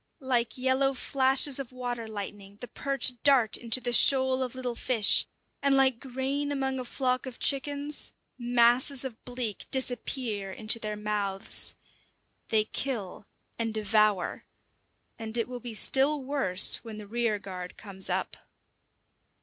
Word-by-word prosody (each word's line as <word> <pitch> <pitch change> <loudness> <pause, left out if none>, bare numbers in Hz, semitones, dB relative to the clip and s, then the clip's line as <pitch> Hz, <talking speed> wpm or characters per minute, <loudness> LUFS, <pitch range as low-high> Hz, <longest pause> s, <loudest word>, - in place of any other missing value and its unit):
Like 245 -2 0
yellow 260 +1 +1
flashes 270 +1 +3
of 265 -3 -6
water 245 -2 -5
lightning 205 -1 -8
the 245 - -7
perch 255 -1 0
dart 260 -6 +4
into 235 +1 +2
the 245 -1 -2
shoal 260 +1 +4
of 255 -1 -3
little 250 -2 -4
fish, 230 -3 +3 0.3
and 275 -1 +3
like 265 -3 +3
grain 270 +2 -3
among 265 -2 -2
a 255 - -5
flock 255 0 -1
of 250 - -8
chickens, 285 +1 +1 0.2
masses 245 +2 +2
of 240 -4 -8
bleak 245 -5 -4
disappear 245 -5 0
into 220 +3 +2
their 215 -1 -4
mouths. 205 -2 -3 0.7
They 220 -1 +3
kill 215 -6 -4 0.3
and 225 -1 -2
devour 210 -3 +1 0.8
and 225 +1 -5
it 230 - -1
will 250 -1 -7
be 240 -2 -6
still 275 +7 +2
worse 255 -9 +3
when 225 -2 -10
the 210 - -9
rear 230 0 -1
guard 185 -3 -9
comes 195 -2 -6
up. - - -2
245 Hz, 140 wpm, -28 LUFS, 215-265 Hz, 0.8 s, dart